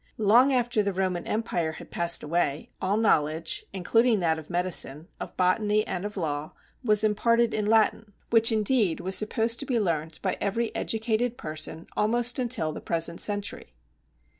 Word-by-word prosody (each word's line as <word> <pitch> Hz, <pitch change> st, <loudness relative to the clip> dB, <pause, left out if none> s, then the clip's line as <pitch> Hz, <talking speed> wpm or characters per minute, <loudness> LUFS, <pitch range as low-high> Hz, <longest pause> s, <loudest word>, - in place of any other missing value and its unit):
Long 230 Hz, +6 st, +5 dB
after 240 Hz, -4 st, +1 dB
the 200 Hz, -1 st, -1 dB
Roman 185 Hz, -2 st, -2 dB
Empire 175 Hz, -8 st, -1 dB
had -, -, -12 dB
passed 170 Hz, 0 st, +1 dB
away, 150 Hz, -2 st, -1 dB
all 195 Hz, +3 st, 0 dB
knowledge, 160 Hz, -6 st, +1 dB
including 225 Hz, +4 st, +2 dB
that 160 Hz, -3 st, +1 dB
of 155 Hz, -, -13 dB
medicine, 175 Hz, -3 st, -1 dB
of -, -, -8 dB
botany, 210 Hz, +3 st, +2 dB
and 185 Hz, +2 st, -4 dB
of 210 Hz, 0 st, -6 dB
law, 150 Hz, -3 st, -3 dB, 0.3 s
was 215 Hz, -3 st, +3 dB
imparted 230 Hz, +2 st, +2 dB
in 210 Hz, -1 st, -1 dB
Latin, 220 Hz, -1 st, +2 dB, 0.2 s
which 230 Hz, 0 st, +5 dB
indeed 215 Hz, -4 st, +1 dB
was 190 Hz, +1 st, 0 dB
supposed 225 Hz, +2 st, +1 dB
to -, -, -3 dB
be 245 Hz, -3 st, +1 dB
learnt 160 Hz, -5 st, -2 dB
by -, -, -1 dB
every 225 Hz, +3 st, -1 dB
educated 225 Hz, +2 st, -1 dB
person 155 Hz, +1 st, -5 dB
almost 240 Hz, +4 st, +2 dB
until 235 Hz, -11 st, 0 dB
the -, -, -8 dB
present 170 Hz, 0 st, -1 dB
century. 205 Hz, -, -2 dB
205 Hz, 165 wpm, -26 LUFS, 170-225 Hz, 0.3 s, Long